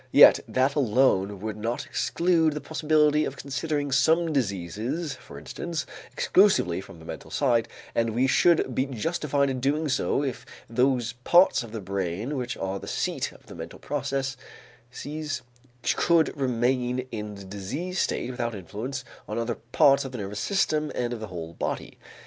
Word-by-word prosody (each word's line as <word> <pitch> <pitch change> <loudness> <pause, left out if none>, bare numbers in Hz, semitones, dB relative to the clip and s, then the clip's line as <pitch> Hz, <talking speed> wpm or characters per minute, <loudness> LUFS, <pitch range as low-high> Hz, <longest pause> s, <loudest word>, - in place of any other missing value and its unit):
Yet - - +9
that 130 +2 +2
alone 105 -7 +2
would 110 0 -4
not 115 +3 -2
exclude 165 -3 +2
the 150 - -3
possibility 150 0 +2
of 140 - -4
considering 145 +1 -2
some 160 +4 +3
diseases, 115 - -2
for - - -12
instance, 170 -2 -4 0.3
exclusively 185 - +3
from 85 - -12
the 80 - -13
mental - - -8
side, 120 -5 +2 0.3
and 115 -1 0
we 125 +2 +3
should 155 0 +3
be 130 +3 0
justified 140 +2 0
in 130 - -3
doing 145 +4 0
so 140 +1 +1
if 130 -4 -3 0.2
those 125 0 +1
parts 175 +2 +5
of 115 -2 -8
the 110 -1 -5
brain 100 - -3
which 125 -2 -3
are 95 0 -3
the - - -9
seat - - -1
of - - -18
the - - -11
mental 80 0 -8
processes 135 +1 -5 0.5
could 170 -2 +3
remain 125 -1 0
in 105 -2 -5
the 100 -1 -10
diseased 135 - -4
state 125 - 0
without 120 -2 -3
influence 115 +8 -5 0.2
on 105 - -4
other 115 0 -2
parts 140 0 +5
of 135 -1 -7
the - - -4
nervous 100 -1 -4
system 155 -6 +1
and 120 -1 -1
of 120 - -5
the 110 - -5
whole 85 -3 -7
body. - - -4
130 Hz, 165 wpm, -26 LUFS, 110-150 Hz, 0.5 s, Yet